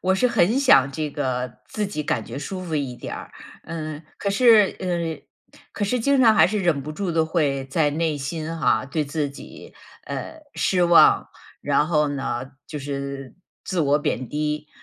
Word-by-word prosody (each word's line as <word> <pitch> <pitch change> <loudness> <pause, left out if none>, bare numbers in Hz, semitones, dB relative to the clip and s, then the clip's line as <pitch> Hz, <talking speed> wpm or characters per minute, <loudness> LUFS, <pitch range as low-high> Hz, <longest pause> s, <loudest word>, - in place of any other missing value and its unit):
我 190 +1 +2
是 250 +6 +2
很 225 +2 +2
想 140 - +5
这 155 0 -3
个 130 -4 -3
自 210 -2 -2
己 195 -6 -4
感 115 -6 -1
觉 120 +4 -7
舒 185 +6 -5
服 165 -3 -4
一 135 -4 -2
点 - - -7
儿。 - - -10 0.3
嗯， 155 -1 -6
可 200 - -2
是， 215 -1 +5
呃， 170 -5 -5
可 205 - -2
是 250 +5 0
经 275 +3 +2
常 225 -3 +6
还 - - +6
是 210 +3 -1
忍 170 -7 +1
不 150 +3 -6
住 190 +3 -3
地 165 -1 +2
会 145 -5 0
在 145 +2 +1
内 155 0 -1
心 155 +3 -4
哈， 155 - +2
对 150 +2 -1
自 145 0 -2
己， 140 - -12 0.3
呃， 320 - -6
失 180 -2 +2
望， 170 0 +5 0.3
然 150 - +2
后 150 -3 +2
呢， 135 -2 -4 0.2
就 150 - -5
是 140 -1 -5 0.3
自 185 -3 -1
我 145 -1 +3
贬 130 -4 -2
低。 150 0 -2
155 Hz, 200 characters per minute, -23 LUFS, 140-185 Hz, 0.3 s, 常